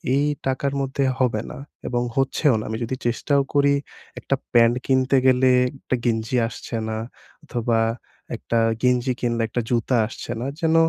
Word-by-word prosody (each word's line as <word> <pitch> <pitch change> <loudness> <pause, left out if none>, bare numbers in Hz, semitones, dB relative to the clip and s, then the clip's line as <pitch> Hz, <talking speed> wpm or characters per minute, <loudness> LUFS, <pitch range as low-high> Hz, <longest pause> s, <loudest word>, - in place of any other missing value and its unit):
এই 145 +1 +2 0.2
টাকার 135 +1 -1
মধ্যে 135 +1 -1 0.2
হবে 115 -4 +1
না - - -8 0.3
এবং 120 0 0
হচ্ছেও 135 +1 +2
না। - - -4
আমি 110 - -2
যদি 130 +3 -2
চেষ্টাও 140 +4 +1
করি 140 0 +4 0.5
একটা 135 - 0 0.2
প্যান্ট 120 0 +5
কিনতে 130 0 +3
গেলে, 130 0 +4 0.3
একটা 130 - -1
গেঞ্জি 115 +1 0
আসছে 115 +1 -7
না 110 - -2 0.5
অথবা 115 -1 0 0.6
একটা 115 - -2 0.3
গেঞ্জি 125 0 +2
কিনলে, 120 -1 0
একটা 120 - -1
জুতা 120 +1 +1
আসছে 115 - -8
না। - - -3 0.2
যেন 160 0 +2
125 Hz, 160 wpm, -23 LUFS, 115-135 Hz, 0.6 s, প্যান্ট